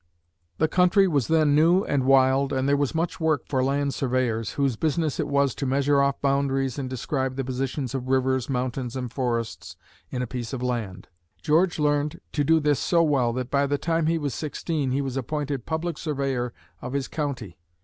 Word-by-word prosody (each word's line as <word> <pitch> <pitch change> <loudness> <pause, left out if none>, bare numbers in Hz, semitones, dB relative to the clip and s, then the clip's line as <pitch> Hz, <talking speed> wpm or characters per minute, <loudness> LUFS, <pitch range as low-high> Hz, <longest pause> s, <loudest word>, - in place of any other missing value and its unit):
The 160 - +2
country 185 +3 +4
was 140 -9 +1
then 155 -3 +3
new 170 +6 +4
and 140 -8 0
wild 135 +1 +4
and 130 0 0
there 140 - +4
was 145 +2 -1
much 165 +1 -1
work 160 -5 0
for 130 -2 0
land 140 +1 0
surveyors, 120 -4 -1
whose 135 -4 0
business 155 +2 -1
it - - 0
was 140 -2 +2
to 140 - -3
measure 140 +1 +2
off 140 0 +1
boundaries 135 -1 0
and 130 -2 -4
describe 130 +1 -2
the 135 - -2
positions 130 0 -3
of 130 -1 -3
rivers, 130 -1 +1
mountains 125 -1 -2
and 125 -2 -4
forests 115 - -3 0.3
in 125 -1 -3
a - - -1
piece 120 -1 -5
of 125 -1 -4
land. 110 -7 -3 0.4
George 165 +3 +3
learned 145 -1 0
to 145 - 0
do 160 +3 +4
this 145 -2 +1
so 170 -1 +3
well 135 -6 +2
that 125 0 -4
by 140 0 +2
the 145 +1 0
time 165 +2 0
he 165 +1 +2
was 145 -5 -2
sixteen, 150 -1 -2
he 135 +2 0
was 135 -1 -3
appointed 140 -1 -3
public 160 0 -2
surveyor 135 -5 -2 0.3
of 125 +1 -6
his 140 -1 -1
county. 130 - -4
140 Hz, 200 wpm, -25 LUFS, 130-150 Hz, 0.4 s, country